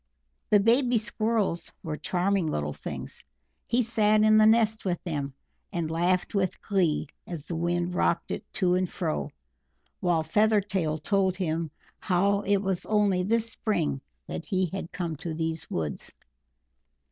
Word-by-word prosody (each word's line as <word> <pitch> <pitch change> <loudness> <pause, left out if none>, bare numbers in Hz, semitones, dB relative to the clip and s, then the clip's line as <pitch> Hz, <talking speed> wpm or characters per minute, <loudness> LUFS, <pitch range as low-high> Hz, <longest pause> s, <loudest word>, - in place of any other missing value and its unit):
The 210 - +6
baby 240 +3 +4
Squirrels 215 -5 -1
were 155 -2 -3
charming 180 +3 0
little 75 - -2
things; - - -7 0.4
he 245 +1 +2
sat 215 -2 +3
in 215 0 +6
the 215 - +7
nest 220 -1 +3
with 180 -2 0
them, 145 -6 -3 0.4
and 170 -4 -2
laughed 175 +2 +1
with 190 -3 0
glee 185 -7 +1 0.2
as 165 -4 -6
the 170 - -4
Wind 175 +1 0
rocked 170 -1 +1
it - - -3
to 185 -3 +2
and 185 -1 +1
fro, 75 -2 -2 0.7
while 170 -3 +2
Feathertail 195 -3 +2
told 195 -2 +2
him 165 -3 -1 0.3
how 200 +2 +2
it 205 0 +2
was 190 -2 -1
only 205 -4 +3
this 230 +4 +1
spring 170 -13 -1 0.2
that - - -6
he 185 -1 +1
had 190 -3 -5
come 170 -4 -3
to 165 0 -5
these 160 0 -3
woods. 75 -4 -3
185 Hz, 150 wpm, -27 LUFS, 165-210 Hz, 0.7 s, the